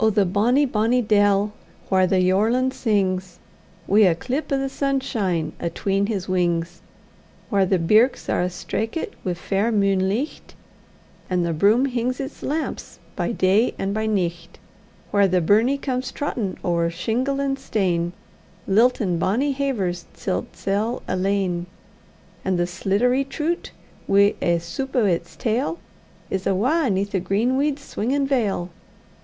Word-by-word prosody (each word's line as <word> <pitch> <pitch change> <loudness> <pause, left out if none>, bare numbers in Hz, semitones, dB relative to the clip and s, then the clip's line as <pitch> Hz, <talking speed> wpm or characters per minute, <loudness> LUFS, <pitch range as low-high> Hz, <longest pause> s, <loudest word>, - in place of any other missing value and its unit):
the 205 -1 +3
bonny, 230 +10 +3
bonny 235 0 +1
dell, 205 -2 +2 0.4
whaur 185 -1 +4
the 185 0 +2
yorlin 220 +8 +2
sings, 190 -7 -1 0.5
Wi' 205 +2 +5
a 165 - +1
clip 265 - -3
o' 275 - +3
the 270 0 -1
sunshine 225 - -1
atween 195 +4 -1
his 200 -4 -3
wings; 175 -2 -1 0.7
Whaur 195 -2 +3
the 190 - +3
birks 215 +9 +3
are - - +1
a' 180 - 0
straikit 215 - -3
wi' 180 -2 -1
fair 200 +6 0
munelicht, 200 +5 0 0.7
And 180 -2 +1
the 170 - -1
broom 210 - +4
hings 250 -1 -1
its 275 +1 -6
lamps 310 +3 -4 0.2
by - - -1
day 210 +2 +2
and 195 +1 -2
by 220 +1 -1
nicht; 175 -4 -2 0.5
Whaur 200 -1 +4
the 185 -1 +2
burnie 220 +10 +3
comes 260 -2 -3
trottin' 230 -9 -3
ower 170 -1 +1
shingle 235 +11 -1
and 275 -1 -1
stane, 175 -4 -1 0.5
Liltin' 205 -4 +2
bonny 250 - +1
havers 205 -11 -2
til 190 - -2
'tsel 210 +5 -2
alane; 185 -2 0 0.8
And 190 -1 0
the 175 - +1
sliddery 200 +9 +1
troot, 310 +5 -3 0.4
wi' 200 +1 +5
ae 170 0 +2
soop 170 +12 -5
o' 240 -4 +3
its 175 -3 -1
tail, 250 +7 -1 0.5
Is 190 0 -1
awa' 255 - +2
'neath 200 +1 0
the 190 - 0
green 205 +8 0
weed's 285 +1 0
swingin' 275 +4 -1
veil! 210 -10 0
205 Hz, 145 wpm, -23 LUFS, 185-250 Hz, 0.8 s, Wi